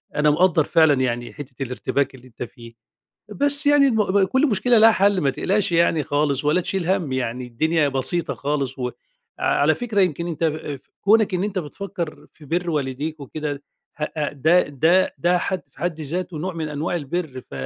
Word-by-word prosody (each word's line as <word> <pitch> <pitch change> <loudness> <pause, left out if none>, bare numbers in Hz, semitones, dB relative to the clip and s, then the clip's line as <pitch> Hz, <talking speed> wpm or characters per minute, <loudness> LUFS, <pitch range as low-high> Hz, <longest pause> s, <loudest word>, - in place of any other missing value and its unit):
أنا 150 0 +3
مقدّر 160 +1 +3
فعلًا 160 0 +4
يعني 120 -1 -2
حتّة 135 -2 -7
الارتباك 135 +2 -2
اللي 130 0 -15
أنت 125 - -8
فيه. 115 -1 -12 0.6
بس 285 +6 +3
يعني 290 -1 +5
الم 220 -5 +2
ب 200 0 +4
كل 265 +10 +2
مشكلة 230 +3 +3
ليها 225 +1 +8
حَل 200 -2 +2
ما 140 - +2
تقلقش 195 +8 0
يعني 165 -2 +2
خالص 145 -1 0
ولا 155 +5 +3
تشيل 180 -1 -3
هَم 180 -8 0
يعني 125 -1 -3
الدنيا 155 +6 +1
بسيطة 135 +5 0
خالص 140 -2 -3
وع 125 -1 -2 0.5
على - - +2
فكرة 225 -5 0
يمكن 170 -2 0
أنت 170 -1 -4
آآ 155 -2 -2
في 135 - -30
كُونك 215 0 +3
إن 180 +1 0
أنت 205 -2 -2
بتفكّر 170 0 -6
في 150 - -16
بِر 175 +4 -1
والديك 150 +1 -3
وكده 145 0 -5 0.3
هأ 150 -1 -3
ده 160 +6 +4
ده 160 +7 +2
ده 175 +1 +2
حد 185 +1 -2
في 135 - -21
حد 165 0 -3
ذاته 170 +3 -4
نوع 180 +4 -4
من 160 -2 -4
أنواع 150 +4 -2
البِر، 155 -4 -4
ف - - -34
160 Hz, 190 wpm, -22 LUFS, 140-185 Hz, 0.6 s, ليها